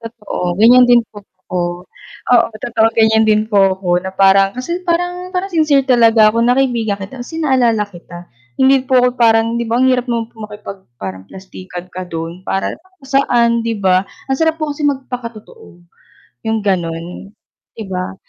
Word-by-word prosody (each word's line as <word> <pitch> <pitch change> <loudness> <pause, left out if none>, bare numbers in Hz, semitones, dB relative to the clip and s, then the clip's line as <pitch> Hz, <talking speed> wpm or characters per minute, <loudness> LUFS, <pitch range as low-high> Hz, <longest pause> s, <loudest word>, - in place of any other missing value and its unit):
Totoo, 210 -6 -5
ganiyan 245 +4 +6
din 240 -1 +5
po 205 - -11
ako. 185 -2 -8 0.7
Oo, 240 - +5
totoo 225 0 0
ganiyan 220 0 +4
din 215 0 +3
po 195 -2 +3
ako 180 -2 0
na 190 +1 -6
parang 195 0 +4
kasi 340 +8 -4
parang 355 +1 -1
parang 380 +2 -2
sincere 300 -4 +2
talaga 230 -4 +4
ako 230 - 0
na 245 +2 +2
kaibigan 235 -6 0
kita 200 +6 -9
kasi 320 +7 -8
naalala 240 -7 +2
kita. 175 -2 -13 0.3
Hindi 265 0 +3
po 260 -1 +3
ako 250 - +3
parang 230 0 +3
'di 235 - -2
ba 230 - -1
ang 260 - +4
hirap 250 0 0
naman 230 -1 -2
po - - -41
makipag 210 -1 -9 0.2
parang 95 -3 -7
plastikan 185 -1 -10
ka 185 0 -6
do'n 165 +1 -6
para 195 - -2 0.3
saan 240 -4 +2
'di 230 -1 -1
ba? 185 0 +2 0.2
Ang 265 - +1
sarap 320 0 +1
po 305 -1 -2
kasi 295 +1 -5
magpakatotoo, 250 - -6 0.7
'yung 220 0 0
gano'n 175 +1 -3 0.5
'di 220 - -5
ba? 185 0 -4
225 Hz, 175 wpm, -16 LUFS, 190-255 Hz, 0.7 s, ganiyan